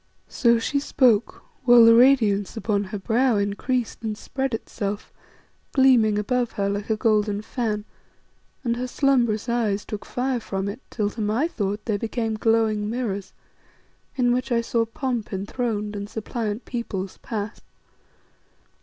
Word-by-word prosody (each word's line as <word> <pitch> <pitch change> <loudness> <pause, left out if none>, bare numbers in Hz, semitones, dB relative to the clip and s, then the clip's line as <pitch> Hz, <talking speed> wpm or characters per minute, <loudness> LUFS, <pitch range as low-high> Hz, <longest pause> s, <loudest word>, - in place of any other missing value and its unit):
So 235 -2 +3
she 280 +5 0
spoke, 245 -6 +2 0.2
while 240 -2 +8
the 230 - +8
radiance 230 -5 +4
upon 205 -2 0
her 205 +2 -5
brow 235 +5 +2
increased 205 +4 -1
and 215 -2 -3
spread 265 0 -2
itself, 205 -2 -5 0.6
gleaming 245 -6 +5
above 245 +3 0
her 200 -1 -1
like 205 +2 -3
a 220 - +1
golden 210 -2 +1
fan, 215 -3 -2 0.8
and 235 -2 0
her 250 +1 -2
slumbrous 245 -5 +1
eyes 220 -4 0
took 210 -1 -6
fire 255 0 -1
from 195 -3 -3
it 210 +6 -5
till, 210 -3 -1
to 225 - -6
my 220 +9 +1
thought, 205 - -3
they 215 -3 0
became 225 +1 -2
glowing 215 -1 +1
mirrors 215 -5 -3 0.8
in 245 -2 +2
which 255 +1 -2
I 235 -1 +3
saw 230 0 0
pomp 240 -1 -3
enthroned 210 +1 -3
and 200 0 -5
suppliant 220 0 -4
peoples 200 -6 -4
pass. 210 -1 -5
225 Hz, 145 wpm, -24 LUFS, 210-245 Hz, 0.8 s, while